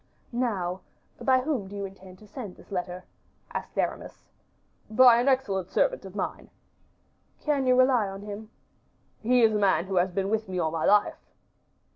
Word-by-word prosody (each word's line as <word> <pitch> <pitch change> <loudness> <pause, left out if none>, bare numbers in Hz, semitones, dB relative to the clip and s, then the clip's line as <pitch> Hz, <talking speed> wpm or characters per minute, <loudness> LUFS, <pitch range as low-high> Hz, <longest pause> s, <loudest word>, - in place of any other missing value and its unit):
"Now, 195 -7 -2 0.4
by 260 -1 +3
whom 255 -8 -2
do 200 - -9
you 200 0 -3
intend 190 -1 -12
to 210 - -17
send 210 -3 -8
this - - -18
letter?" 180 -1 -4 0.5
asked - - -6
Aramis. - - -3 0.6
"By 240 +1 +7
an 250 - -1
excellent 200 -9 +1
servant - - +1
of - - -10
mine." - - -4 0.9
"Can 285 -4 0
you 250 0 +4
rely 255 -5 +4
on 195 +1 -8
him?" 210 +1 -8 0.7
"He 245 +2 +3
is 220 -1 +5
a 210 - +1
man 190 -4 +3
who 190 -1 -2
has 180 +1 +3
been 195 +2 -2
with 220 -2 -1
me 185 - -3
all 160 -3 0
my 160 -1 -1
life." 210 0 +2
205 Hz, 175 wpm, -27 LUFS, 190-250 Hz, 0.9 s, By